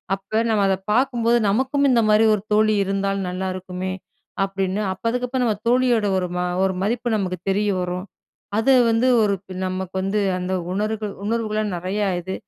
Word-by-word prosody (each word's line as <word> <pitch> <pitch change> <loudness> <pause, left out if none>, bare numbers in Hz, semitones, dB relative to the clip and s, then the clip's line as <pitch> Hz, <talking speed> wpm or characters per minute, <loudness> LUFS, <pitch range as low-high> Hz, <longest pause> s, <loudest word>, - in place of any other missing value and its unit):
அப்ப 195 +3 -2
நம்ம 215 -2 +2
அத 190 - +2 0.2
பாக்கும்போது, 240 -1 +2
நமக்கும் 265 +6 +1
இந்த 235 -2 +4
மாதிரி 215 +1 +5
ஒரு 205 - -5
தோழி 215 0 +4
இருந்தால் 195 0 -1
நல்லாயிருக்குமே! 185 0 -4 0.5
அப்பிடின்னு, 195 +1 -2
அப்ப 190 - -18
அதுக்கப்பறம் 250 +1 -1
நம்ம 215 -3 0
தோழியோட 245 -3 +3
ஒரு 180 -1 -1
ம - - -1 0.2
ஒரு 190 0 +1
மதிப்பு 240 +4 -1
நமக்கு 185 -3 -2
தெரிய 205 +2 +1
வரும். 180 +1 -3 0.5
அது 225 +5 +3 0.2
வந்து 225 +3 +2
ஒரு 205 -2 +2
இப்ப 190 0 -12
நமக்கு 185 0 -4
வந்து 195 +2 0 0.2
அந்த 180 +1 -3 0.2
உணர்கள் 215 +1 -2
உணர்வுகள 215 -1 -1 0.2
நெறையா 190 +4 -2
இது. 190 +2 -5
205 Hz, 165 wpm, -22 LUFS, 190-230 Hz, 0.5 s, மாதிரி